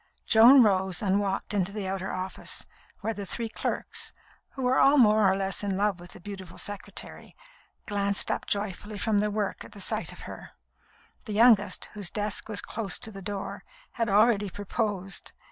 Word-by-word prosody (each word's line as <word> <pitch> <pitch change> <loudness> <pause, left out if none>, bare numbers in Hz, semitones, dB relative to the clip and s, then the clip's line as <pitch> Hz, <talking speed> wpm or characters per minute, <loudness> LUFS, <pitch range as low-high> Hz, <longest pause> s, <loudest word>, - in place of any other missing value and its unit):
Joan 240 +4 +8
rose 190 -2 +2
and 195 0 +2
walked 195 0 -2
into 195 -1 0
the 205 -2 -4
outer 190 0 -3
office, 185 +1 -3 0.4
where 225 +2 -1
the 205 - -6
three 230 +3 -2
clerks, - - -3 0.4
who 265 - -5
were 250 +1 +3
all 280 +2 +6
more 215 -5 +5
or 190 - 0
less 195 +1 0
in 195 -2 -1
love 200 -2 +1
with 175 0 -10
the - - -11
beautiful 190 -2 -9
secretary, 205 -1 -6 0.5
glanced 200 -1 0
up - - -3
joyfully 205 +1 -2
from 210 +1 +1
their 210 +1 +1
work 205 -1 -2
at 205 - -12
sight 190 - -1
of - - -12
her. - - -10 0.7
The 215 - -5
youngest, 220 -1 +4
whose 205 -4 0
desk 210 0 -2
was 205 -2 -2
close 215 -4 -1
to 220 - -6
the 195 -1 -9
door, 200 +1 -5 0.3
had 230 -2 -1
already 210 0 +4
proposed. 205 -1 -2
205 Hz, 180 wpm, -27 LUFS, 195-215 Hz, 0.7 s, Joan